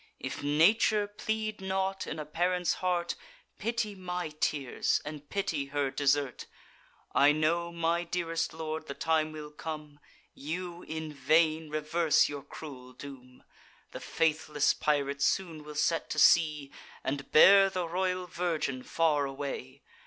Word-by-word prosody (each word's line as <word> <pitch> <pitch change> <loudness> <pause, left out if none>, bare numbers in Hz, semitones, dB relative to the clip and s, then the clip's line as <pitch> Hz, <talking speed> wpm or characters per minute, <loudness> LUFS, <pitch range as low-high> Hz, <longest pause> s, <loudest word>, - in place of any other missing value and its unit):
If - - -5
nature 205 +8 +4
plead 215 0 -3
not 190 0 -2
in 160 - -4
a 155 - -5
parent's 175 +3 0
heart, 175 -2 0 0.5
Pity 230 -2 -1
my 180 -3 -4
tears, 150 -3 0
and 150 -1 -8
pity 165 -8 -1
her 140 -1 -1
desert. 140 -1 0 0.7
I 145 +1 +6
know, 170 +3 0
my 170 0 0
dearest 170 -1 -2
lord, 160 0 -5
the 140 - -5
time 160 -1 +1
will 150 -1 -8
come, 150 -1 -7 0.3
You'd 175 +4 -6
in 160 -1 -4
vain, 155 +3 +2
reverse 155 +1 +2
your 145 -1 -6
cruel 130 -4 -10
doom; 130 -2 -12 0.5
The - - -7
faithless 150 -2 +1
pirate 140 -2 0
soon 165 0 0
will 150 0 -9
set 160 +2 0
to - - -4
sea, 150 -4 +4 0.3
And 140 0 -3
bear 195 +4 +8
the 185 -2 -2
royal 185 +1 -1
virgin 165 -7 -2
far 150 -1 +1
away! 135 -1 -6
155 Hz, 140 wpm, -30 LUFS, 145-175 Hz, 0.7 s, bear